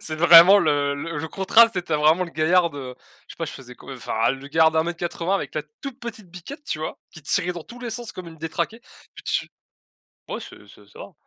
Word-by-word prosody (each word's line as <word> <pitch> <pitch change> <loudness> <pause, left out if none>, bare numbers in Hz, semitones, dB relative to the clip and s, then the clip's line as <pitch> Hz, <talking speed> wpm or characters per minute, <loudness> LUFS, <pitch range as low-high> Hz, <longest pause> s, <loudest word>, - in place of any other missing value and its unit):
C'est 155 - -4
vraiment 170 +4 +8
le 145 -5 +1
le 165 +2 -5
le 160 +1 -5
contraste, 225 +6 +4
tu - - -1
sais, 175 - -4
tu 160 - -5
as - - +3
vraiment 155 +5 +3
le 170 - -10
gaillard 170 +2 +2
de, 145 - -9
heu, 130 -2 -7 0.3
je - - -11
sais - - -37
pas, 165 - -2
je 150 - -7
faisais 125 -2 -12
quoi 135 - -10
enfin 115 -2 -1
le 135 +1 -9
gaillard 160 +1 +4
d'1 160 - +2
m - - +1
80 175 +2 -2
avec - - -6
la - - -2 0.2
toute 275 -3 -8
petite 225 -5 -8
biquette 185 - -10
tu 155 - -4
vois? 155 - -5
Qui 160 - -13
tirait 170 +5 0
dans 175 -2 -8
tous 240 +7 -13
les 240 -2 -6
sens 235 0 -5
comme 180 -2 -9
une 165 - -11
détraquée 165 +7 -4
et 235 - -18
tu - - -1 0.8
ouais - - -5
c'est - - -13
c'est - - -18
ça. - - -12
170 Hz, 260 wpm, -23 LUFS, 155-195 Hz, 0.8 s, vraiment